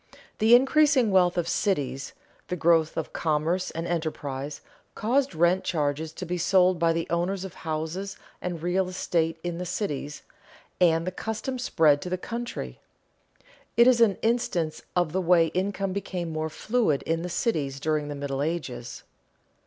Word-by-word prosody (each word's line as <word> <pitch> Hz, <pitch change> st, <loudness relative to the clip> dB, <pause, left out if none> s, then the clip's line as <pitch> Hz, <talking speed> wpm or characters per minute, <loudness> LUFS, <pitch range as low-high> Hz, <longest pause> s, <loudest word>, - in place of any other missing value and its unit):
The 225 Hz, +2 st, +7 dB
increasing 270 Hz, -2 st, +4 dB
wealth 180 Hz, -2 st, +4 dB
of 170 Hz, -1 st, 0 dB
cities, 140 Hz, -9 st, -1 dB, 0.3 s
the 180 Hz, -, -2 dB
growth 165 Hz, -2 st, +3 dB
of -, -, -3 dB
commerce 165 Hz, +4 st, 0 dB
and 165 Hz, +1 st, -5 dB
enterprise, 150 Hz, -4 st, -3 dB, 0.3 s
caused 255 Hz, +1 st, +1 dB
rent 175 Hz, +3 st, +3 dB
charges 155 Hz, -1 st, -1 dB
to 185 Hz, -, -6 dB
be 180 Hz, +1 st, -3 dB
sold 185 Hz, 0 st, +3 dB
by 165 Hz, 0 st, +3 dB
the 165 Hz, 0 st, -1 dB
owners 180 Hz, +3 st, -1 dB
of 190 Hz, -, -8 dB
houses 165 Hz, +5 st, -4 dB, 0.2 s
and 175 Hz, -3 st, -4 dB
real 180 Hz, +1 st, +1 dB
estate 165 Hz, -3 st, -1 dB
in 175 Hz, -1 st, -3 dB
the 180 Hz, -, -3 dB
cities, 150 Hz, -6 st, -4 dB, 0.6 s
and 165 Hz, -2 st, +4 dB
the 185 Hz, -, -2 dB
custom 225 Hz, +6 st, -4 dB
spread 155 Hz, -, +3 dB
to 180 Hz, -, -5 dB
the 185 Hz, -, -1 dB
country. 235 Hz, +5 st, -5 dB, 1.0 s
It 235 Hz, -, +8 dB
is 245 Hz, -2 st, +5 dB
an 210 Hz, -4 st, +4 dB
instance 220 Hz, -9 st, 0 dB
of 175 Hz, -3 st, +2 dB
the 190 Hz, +3 st, 0 dB
way 170 Hz, -2 st, +4 dB
income 195 Hz, +1 st, -1 dB
became 180 Hz, -4 st, -4 dB
more 155 Hz, 0 st, -2 dB
fluid 215 Hz, -, 0 dB
in 165 Hz, 0 st, -1 dB
the 180 Hz, -, -4 dB
cities 150 Hz, -, -1 dB
during 155 Hz, 0 st, 0 dB
the 145 Hz, -, -5 dB
Middle 140 Hz, -1 st, -3 dB
Ages. 130 Hz, -7 st, -4 dB
175 Hz, 160 wpm, -26 LUFS, 155-190 Hz, 1.0 s, It